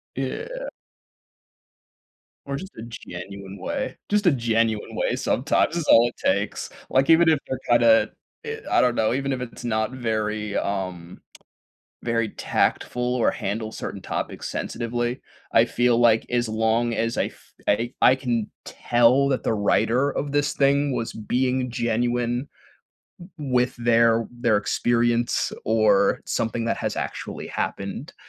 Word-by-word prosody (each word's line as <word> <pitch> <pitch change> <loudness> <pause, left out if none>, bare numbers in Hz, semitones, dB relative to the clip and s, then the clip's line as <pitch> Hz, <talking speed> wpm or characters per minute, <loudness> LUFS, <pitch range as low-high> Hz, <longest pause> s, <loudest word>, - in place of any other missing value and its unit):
Yeah. - - -4 1.8
Or 140 0 -3
just 190 +7 -7
a 110 - -7
genuine 100 -1 -9
way, 275 -2 -3
just 210 0 +1
a 175 - +6
genuine 115 -3 0
way - - 0
sometimes 145 +5 +1
is 170 - -1
all 115 +1 +7
it - - -16
takes, - - 0 0.2
like, 135 +1 +3
even 165 0 +6
if 155 - +4
they're 130 - -3
kinda, 275 - +5 0.3
i 450 -1 -3
I - - +6
don't 125 -1 +2
know, 110 +1 +2
even 140 +1 -1
if 130 -1 -2
it's 125 0 -8
not 110 -1 0
very, 110 -4 -2
um, 90 -3 -4 0.8
very 115 -2 0
tactful 125 +4 -1
or 120 - +2
handle 110 +2 -4
certain 100 - -6
topics - - -4
sensitively, 120 +2 -3 0.3
I 115 - +6
feel 120 0 +2
like 115 -2 +4
as 120 -1 +1
long 110 +2 +1
as 115 +1 -1
I - - +2
f - - -12 0.2
I 115 +4 +1
I 130 - +7
can 120 -5 -2
tell 120 +3 +3
that 130 - 0
the - - +1
writer 120 +6 +2
of 145 +1 -3
this 145 0 +1
thing 140 0 +2
was 115 - -3
being 125 +3 -1
genuine 120 +2 -1 0.9
w 140 -4 -5
with 125 0 +2
their 115 -1 +3
their 120 -3 +1
experience 120 +2 +1
or 110 -2 +3
something 115 0 -1
that 115 - -1
has - - -3
actually - - -5
happened, 100 +9 -4
120 Hz, 145 wpm, -24 LUFS, 110-130 Hz, 1.8 s, all